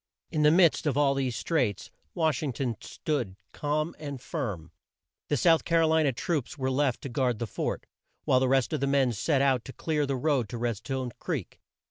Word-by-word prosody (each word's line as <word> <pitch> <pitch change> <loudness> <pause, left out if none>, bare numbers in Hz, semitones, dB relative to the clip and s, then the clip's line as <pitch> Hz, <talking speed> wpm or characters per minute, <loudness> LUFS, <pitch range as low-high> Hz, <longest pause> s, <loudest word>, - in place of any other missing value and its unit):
In 155 - 0
the 150 - +6
midst 170 -1 +4
of 140 -2 +1
all 140 -1 +4
these 130 -3 -1
straits 125 - -1 0.2
Wash 160 -2 +1
ing 145 -5 -2
ton 120 -1 -2
stood 125 -12 -3 0.2
calm 155 +3 -1
and 145 -3 -6
firm. 95 -10 -4 0.6
The 145 - +1
South 165 +3 +4
Car 165 -1 +3
o - - +4
li 160 0 +4
na 145 -3 +3
troops 155 -1 -2
were 130 -1 -1
left 135 -1 +1
to - - -3
guard 125 -2 0
the 115 - -2
fort, 105 - -3 0.4
while 130 - +4
the 130 - +2
rest 135 -1 +2
of - - 0
the 140 - 0
men 135 -2 +3
set 135 +6 +1
out 130 -4 +2
to 130 - -8
clear 150 -3 -1
the 135 - 0
road 130 -4 +1
to 120 - -5
Red 115 -2 -1
stone 130 +1 -4
Creek. - - -4
135 Hz, 215 wpm, -28 LUFS, 125-150 Hz, 0.6 s, the